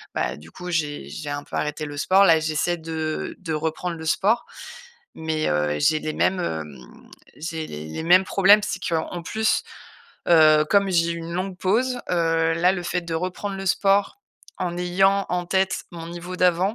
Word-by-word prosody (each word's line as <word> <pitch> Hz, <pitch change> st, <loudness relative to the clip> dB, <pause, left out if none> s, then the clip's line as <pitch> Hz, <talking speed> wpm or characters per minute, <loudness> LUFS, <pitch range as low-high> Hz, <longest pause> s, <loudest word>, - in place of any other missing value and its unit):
bah, -, -, -1 dB
du 80 Hz, +2 st, -14 dB
coup, 180 Hz, 0 st, -8 dB
j'ai 145 Hz, -, -2 dB
j'ai 145 Hz, -, -6 dB
un 145 Hz, 0 st, -4 dB
peu -, -, -9 dB
arrêté 150 Hz, +1 st, -2 dB
le 145 Hz, 0 st, -7 dB
sport. 190 Hz, +6 st, +4 dB
Là, 165 Hz, -2 st, +5 dB
j'essaie 155 Hz, +2 st, -1 dB
de 160 Hz, -1 st, -4 dB
de 165 Hz, -4 st, -4 dB
reprendre 160 Hz, +3 st, -2 dB
le 160 Hz, -, -8 dB
sport, 205 Hz, +8 st, +1 dB, 0.7 s
mais, 160 Hz, -1 st, -2 dB
heu, 75 Hz, 0 st, 0 dB
j'ai 155 Hz, +1 st, +3 dB
les 155 Hz, -, -3 dB
mêmes, 185 Hz, -1 st, +1 dB
hem, 75 Hz, -, -4 dB, 0.6 s
j'ai 160 Hz, 0 st, -5 dB
les 75 Hz, +1 st, -7 dB
les 120 Hz, -, -5 dB
mêmes 180 Hz, +3 st, +6 dB
problèmes. 200 Hz, +2 st, +5 dB
C'est 185 Hz, -3 st, -4 dB
qu'en 170 Hz, +1 st, -2 dB
plus, 220 Hz, +6 st, 0 dB, 0.7 s
heu, 155 Hz, -2 st, +6 dB
comme 200 Hz, -1 st, +3 dB
j'ai 170 Hz, -1 st, +2 dB
eu 170 Hz, -, -5 dB
une 165 Hz, +1 st, -7 dB
longue 185 Hz, +1 st, -3 dB
pause, 245 Hz, +6 st, +1 dB
heu, 165 Hz, -1 st, +2 dB
là, 180 Hz, +3 st, +3 dB
le 180 Hz, -2 st, -4 dB
fait 180 Hz, 0 st, -1 dB
de 170 Hz, -1 st, -5 dB
reprendre 185 Hz, +4 st, -3 dB
le 195 Hz, 0 st, -6 dB
sport 195 Hz, -, +2 dB, 0.4 s
en 175 Hz, -1 st, -2 dB
ayant 195 Hz, +3 st, +2 dB
en 180 Hz, -1 st, -1 dB
tête 190 Hz, +1 st, 0 dB
mon 165 Hz, -1 st, -8 dB
niveau 175 Hz, +1 st, -7 dB
d'avant, 180 Hz, +4 st, +2 dB
170 Hz, 190 wpm, -23 LUFS, 155-185 Hz, 0.7 s, mêmes